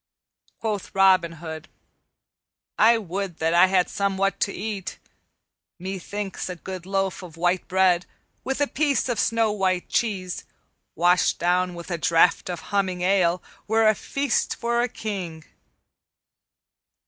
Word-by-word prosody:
Quoth 210 -4 -4
Robin 185 -3 +4
Hood, 160 0 -8 1.1
"I 230 +2 +6
would 195 -3 -4
that 160 +1 0
I 175 +2 +7
had 185 -1 +2
somewhat 195 0 0
to 200 - +1
eat. 200 -2 -5 0.8
Methinks 195 +2 -5
a 180 - -4
good 185 +1 -8
loaf 195 0 -1
of 170 -3 -11
white 175 +2 0
bread, 180 -1 +3 0.4
with 270 +1 -2
a - - +5
piece 285 -1 0
of 240 - -1
snow 230 -1 +2
white 190 -3 0
cheese, 190 -6 -1 0.5
washed 175 +2 +3
down 180 +1 +1
with 170 +1 -8
a 170 - -2
draught 165 +3 +3
of 175 - -4
humming 190 -3 0
ale, 180 -2 +2 0.2
were 220 +1 +3
a 215 - +6
feast 275 +6 -1
for 235 0 0
a 245 - 0
king." 185 -8 -5
190 Hz, 135 wpm, -24 LUFS, 175-205 Hz, 1.1 s, I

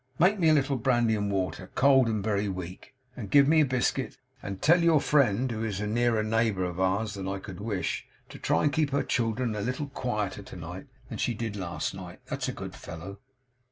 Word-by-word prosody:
Make 195 +5 +4
me 165 -3 +4
a - - +6
little 140 -1 +1
brandy 120 -2 +2
and 105 -1 -1
water 95 -1 -2
cold 135 -2 +5
and 105 -3 -1
very 105 -1 0
weak 95 +6 -7 0.2
and 105 -6 -7
give 140 +3 +6
me 155 +1 +5
a - - +4
biscuit, 130 -2 -1 0.2
and 100 -1 -6
tell 170 +3 +5
your 165 -2 +5
friend, 130 -4 +2
who 110 -1 -3
is 105 -4 -2
a 105 - -2
nearer 115 0 +1
neighbour 110 -3 +1
of 90 0 -3
ours 100 +3 +1
than 95 -2 -5
I 95 0 -2
could 95 -1 -9
wish, 100 -3 -3 0.2
to - - -10
try - - +1
and 145 -1 +2
keep 155 -2 +2
her 140 0 0
children 115 -1 0
a 105 - -3
little 130 +6 -3
quieter 105 -7 -3
to 95 - -11
night 90 +2 -8 0.2
than - - -6
she 120 - 0
did 110 -1 -4
last 85 -5 -3
night; - - -9
that's - - -3
a - - -1
good - - -7
fellow. 95 +5 -9
110 Hz, 225 wpm, -28 LUFS, 100-130 Hz, 0.2 s, a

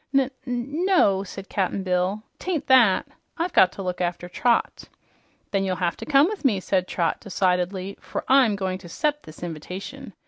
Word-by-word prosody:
"N 270 -1 +3 0.2
n 250 +7 -2
no," 205 - +4
said 195 0 -9
Cap'n 195 0 -1
Bill, 185 +3 0 0.2
"'tain't 330 -6 -2
that. 250 -8 +5 0.3
I've 340 +2 -2
got 185 - +6
to 195 - -6
look 180 0 -3
after 175 0 -2
Trot." 235 +6 0 0.7
"Then 195 -1 +1
you'll 190 -1 0
have 175 -1 -1
to - - -8
come 285 -1 +6
with 420 0 -5
me," 225 -8 +3
said 185 -1 0
Trot 170 -2 -1
decidedly, 185 0 -1
"for - - -5
I'm 260 -6 +5
going 190 -1 -3
to 175 -2 -12
'cept 295 - -1
this 155 - -12
inv'tation. 175 +3 -7
195 Hz, 180 wpm, -24 LUFS, 180-260 Hz, 0.7 s, got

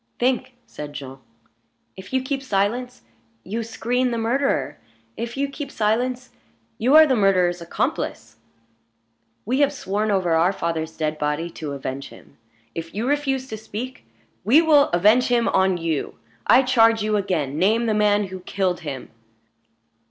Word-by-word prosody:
"Think!" 255 +1 0
said 150 -1 -8
Jean. 135 -2 -8 0.8
"If 190 0 -11
you 260 0 0
keep 270 +1 -2
silence, 245 - -1 0.4
you 220 +5 -3
screen 245 +3 -1
the 235 - -2
murderer. 225 - 0 0.4
If 235 +2 -5
you 280 +1 0
keep 280 0 -7
silence, 245 +3 -1 0.5
you 255 +6 +3
are 315 0 +10
the 265 -4 +2
murderer's 185 -4 +2
accomplice. 170 - -3 1.1
We 255 +6 0
have 285 -1 +4
sworn 215 -5 -2
over 190 -4 +1
our 170 +4 +3
father's 165 -3 -3
dead 155 -1 -2
body 150 +3 -2
to 150 -3 -6
avenge 135 0 -5
him; - - -17 0.3
if 165 +2 -7
you 225 +4 -2
refuse 270 -2 0
to 220 - -5
speak, 225 +4 -7 0.4
we 260 +8 +6
will 305 -3 +5
avenge 210 +8 +4
him 240 -1 +2
on 190 -1 +2
you. 165 -3 -2 0.3
I 265 - +6
charge 230 -3 +4
you 215 0 0
again, 160 -8 -1
name 220 +6 +3
the 220 - +1
man 210 -1 +2
who 185 0 -7
killed 185 0 -1
him." 145 -6 -7
215 Hz, 155 wpm, -22 LUFS, 175-255 Hz, 1.1 s, are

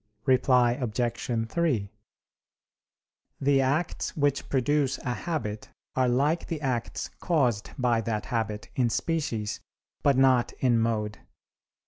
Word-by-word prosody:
Reply 125 -2 +4
Obj. 120 -1 -2
3: 115 -8 0 1.5
The 135 0 +3
acts 145 +7 -1
which 145 -2 +1
produce 140 +1 +1
a 125 - -3
habit 120 -9 -4 0.3
are 130 -1 +3
like 145 +7 +1
the 165 - -3
acts 130 -5 -2
caused 125 - +1
by 120 -3 +2
that 110 -2 -2
habit, 110 -2 -2
in 125 -3 +2
species, 115 -7 -1 0.4
but 140 -2 +3
not 130 -2 +4
in 120 -3 +2
mode. 105 -3 -1
125 Hz, 115 wpm, -27 LUFS, 115-140 Hz, 1.5 s, Reply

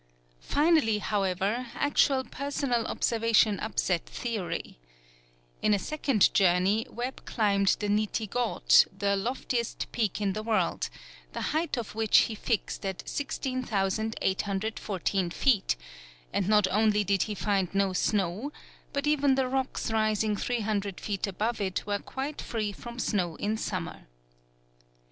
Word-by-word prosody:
Finally, 295 -8 +3
however, 205 +3 -1
actual 280 -2 +2
personal 265 -3 -2
observation 230 -2 +2
upset 185 -5 0
theory. 220 - -4 0.8
In 210 - +4
a - - +1
second 270 -2 +2
journey, 190 +3 +3
Webb 245 +3 -5
climbed 200 -3 +2
the 210 - -2
Niti 215 +1 0
Ghaut, 240 +3 +4
the 200 0 +1
loftiest 235 +2 -2
peak 215 -5 -1
in 200 -2 0
the 215 - -3
world, 215 -6 0 0.4
the - - -4
height 315 -2 0
of 235 -3 -4
which 220 -1 +3
he 225 - -1
fixed 215 0 -2
at 190 -2 -4
16,814 205 -6 -1
feet, 205 - +2 0.6
and 185 - 0
not 210 -2 +5
only 210 +1 +3
did 195 -1 +1
he 210 +2 -1
find 195 -3 0
no 195 -1 +2
snow, 200 +7 0 0.4
but 280 0 -1
even 285 -2 +3
the 265 -1 +1
rocks 260 -3 -2
rising 215 -1 +1
300 205 -4 -2
feet 205 -1 -2
above 215 +4 -2
it 190 -2 -2
were 205 0 -1
quite 275 +7 -5
free 215 -3 -2
from 235 +4 -9
snow 180 -9 0
in 210 +6 -1
summer. 185 -5 -4
215 Hz, 130 wpm, -28 LUFS, 195-240 Hz, 0.8 s, not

